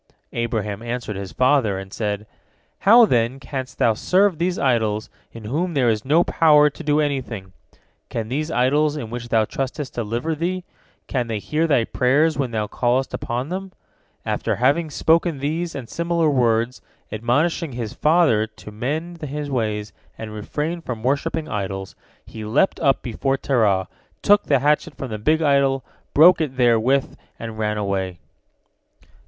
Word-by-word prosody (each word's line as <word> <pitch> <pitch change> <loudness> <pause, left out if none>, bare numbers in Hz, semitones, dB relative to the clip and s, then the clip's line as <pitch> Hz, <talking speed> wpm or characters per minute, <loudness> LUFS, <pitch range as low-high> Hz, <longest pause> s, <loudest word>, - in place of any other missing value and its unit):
Abraham 110 -3 -2
answered 120 -2 -4
his 95 -1 -6
father, 125 -6 +2
and 95 0 -8
said: 105 -1 -3 0.5
"How, 230 +4 +7
then, 120 - +1
canst 130 -2 -6
thou 115 - +3
serve 185 - +2
these 180 +1 0
idols 110 -5 0 0.2
in 115 - -10
whom 160 +10 -2
there 125 -4 +3
is 110 -1 0
no 155 +6 +4
power 150 -3 +4
to 165 - -10
do 150 0 +2
anything? 125 -10 -3 0.6
Can 115 -2 -3
these 150 +6 -2
idols 150 +2 +2
in 115 -6 -6
which 120 0 -6
thou 110 -2 +3
trustest 135 +4 -4
deliver 120 +7 -2
thee? 180 +4 -2 0.4
Can 125 -3 -2
they 110 -2 -2
hear 155 +10 -1
thy 140 -7 +3
prayers 145 +7 +2
when 135 -3 -1
thou 110 -2 -1
callest 125 +5 0
upon 125 +4 -3
them?" 190 +1 -5 0.5
After - - -1
having 140 - +2
spoken 165 +1 +2
these 160 +5 -2
and 130 -4 -6
similar 170 +2 0
words, 120 -1 +1 0.3
admonishing 140 +8 0
his 115 -3 -4
father 150 -9 +3
to 110 -1 -13
mend 155 +10 -4
his 150 -1 -4
ways 105 -4 -2 0.2
and 110 -1 -7
refrain 150 +10 -3
from 120 -8 -6
worshipping 140 +4 -1
idols, 95 -4 -4 0.3
he 110 - -9
leapt 125 - +1
up 135 -1 +2
before 135 +3 -1
Terah, 105 -9 +1 0.4
took 205 0 +4
the 140 - +3
hatchet 150 +2 +1
from 130 -4 -6
the 105 - -4
big 155 +8 +2
idol, 140 -2 +2 0.3
broke 165 +3 +7
it 135 -5 -3
therewith, 125 +2 +2 0.2
and 115 -1 -7
ran 105 -1 -1
away. 95 -3 -2
130 Hz, 160 wpm, -22 LUFS, 110-155 Hz, 0.6 s, How